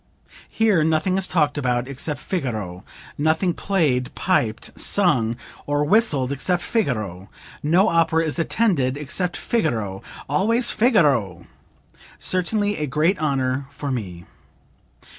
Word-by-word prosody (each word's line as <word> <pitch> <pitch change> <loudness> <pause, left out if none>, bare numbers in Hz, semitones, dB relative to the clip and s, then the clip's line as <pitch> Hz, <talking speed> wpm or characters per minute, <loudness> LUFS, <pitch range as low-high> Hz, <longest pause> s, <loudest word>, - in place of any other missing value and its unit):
Here 215 -8 +2
nothing 160 +4 +1
is 190 -1 0
talked 150 -4 +1
about 125 -2 0
except 140 +1 -4
'Figaro,' 110 - -4 0.4
nothing 160 +4 +1
played, 150 -13 0
piped, 120 -12 0
sung 125 - +2 0.3
or 145 0 +1
whistled 150 - +2
except 175 +6 0
'Figaro;' 110 - -2 0.3
no 175 +7 +3
opera 165 -2 +2
is 155 +2 -2
attended 160 - +1
except 165 +5 -2
'Figaro,' 110 - -1 0.3
always 225 - +2
'Figaro.' 140 - +2 0.7
Certainly 205 +3 0
a 150 - -2
great 155 +8 +1
honor 135 -3 -1
for 140 0 -5
me." 90 -9 -5
150 Hz, 115 wpm, -22 LUFS, 125-185 Hz, 0.7 s, no